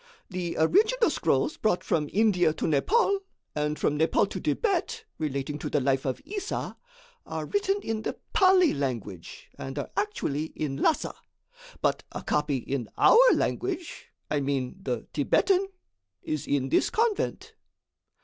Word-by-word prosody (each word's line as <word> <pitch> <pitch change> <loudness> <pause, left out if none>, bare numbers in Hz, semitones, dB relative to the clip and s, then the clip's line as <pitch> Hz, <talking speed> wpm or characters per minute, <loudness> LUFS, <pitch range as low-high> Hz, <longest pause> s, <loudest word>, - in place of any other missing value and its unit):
"The 180 -2 -3
original 435 - +3
scrolls - - +1
brought 215 -5 +1
from 150 -3 0
India 190 -6 +3
to - - -3
Nepaul, 395 - +2 0.3
and 150 0 -1
from 150 - 0
Nepaul 160 - +3
to - - -4
Thibet, 445 +1 -1
relating 145 -1 -3
to - - -4
the 145 - +1
life 135 0 +1
of 130 -2 -3
Issa, 400 +1 -4 0.5
are - - -4
written 405 -1 0
in 225 -1 -2
the - - -4 0.2
Pali 370 -3 +5
language 115 -11 -5
and 135 +1 -6
are 145 - -4
actually 195 -8 -1
in 140 -3 -3
Lhassa; 320 - +1 0.7
but - - +2
a - - -5
copy 150 -2 0
in 125 -2 -4
our 465 - +7 0.2
language 365 -2 -3 0.2
I 150 - +2
mean 135 +1 -2
the - - -3
Thibetan 390 0 +2 0.6
is 155 -2 -3
in 135 -2 0
this - - +3
convent." 445 -2 -1
160 Hz, 145 wpm, -27 LUFS, -, 0.7 s, our